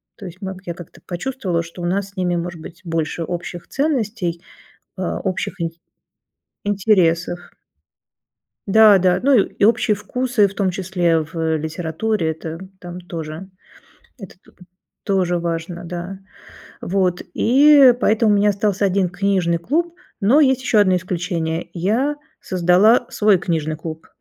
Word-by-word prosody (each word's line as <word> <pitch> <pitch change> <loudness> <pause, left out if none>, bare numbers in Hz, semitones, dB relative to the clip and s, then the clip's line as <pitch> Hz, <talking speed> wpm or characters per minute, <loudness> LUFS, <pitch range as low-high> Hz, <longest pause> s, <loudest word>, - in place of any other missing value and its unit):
то 205 - -11
есть 185 +2 -10
маг 190 -1 -5
я 170 - -4
как-то 175 0 -13
почувствовала 180 -2 -3
что 170 +2 -11
у 175 - -3
нас 195 +2 -1
с 200 - -25
ними 180 -2 0
может 170 -1 -4
быть 165 +2 -11
больше 165 -1 -2
общих 175 +1 -6
ценностей, 225 - -1 0.6
а 185 -2 -3
общих 190 -1 -3
ин 165 - -1 0.9
интересов. 185 -4 +2 1.3
Да-да, 195 -3 +5
ну, 275 -2 +5
и 200 - 0
общие 220 -1 +3
вкусы, 230 +1 0
в 195 - -10
том 195 -1 0
числе, 175 -3 0
в, 160 +2 -7
э, 160 -1 0
литературе- 160 +4 -2
это 160 +1 -7 0.2
там 175 0 -8
тоже, 165 +1 -7 0.7
это 195 -5 -11
то - - -21 0.5
тоже 180 -3 +1
важно, 170 +1 -4
да. 175 +2 -6 0.6
Вот 180 -1 0
и 275 +1 +6
поэтому 220 -1 +3
у 205 - +4
меня 205 +1 +3
остался 200 0 0
1 190 -1 +1
книжный 180 -2 0
клуб, 330 - -1 0.3
но 230 +9 +4
есть 265 -3 +3
еще 230 - +2
одно 190 -3 +4
исключение- 175 -2 -3
я 230 - 0 0.2
создала 185 +7 +3
свой 210 -3 +3
книжный 160 -3 -2
клуб. 160 0 -8
185 Hz, 145 wpm, -20 LUFS, 170-210 Hz, 1.3 s, и